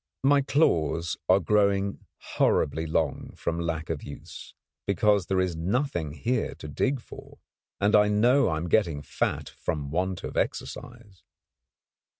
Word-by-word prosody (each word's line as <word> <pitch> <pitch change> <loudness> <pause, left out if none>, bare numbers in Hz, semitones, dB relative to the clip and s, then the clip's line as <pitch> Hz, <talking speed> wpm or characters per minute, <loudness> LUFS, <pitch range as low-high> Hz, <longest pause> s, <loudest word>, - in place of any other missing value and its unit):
My 140 +1 +5
claws 85 - +1
are 95 +1 +6
growing 100 +1 +1 0.4
horribly 80 +3 +2
long 80 -3 -1
from 85 0 -2
lack 80 -1 -2
of 80 - -3
use, 70 - -10 0.3
because 100 0 +2
there 95 -1 +1
is 90 -2 0
nothing 85 - -1
here 115 - -1
to - - -9
dig 130 - 0
for; - - -13 0.4
and 105 +1 +3
I 105 0 +6
know 120 +6 +4
I 80 - 0
am 85 +3 -3
getting 85 -7 +1
fat - - -2
from 70 -2 -4
want 90 +2 -1
of - - -6
exercise. 115 -6 -4
95 Hz, 145 wpm, -27 LUFS, 80-105 Hz, 0.4 s, are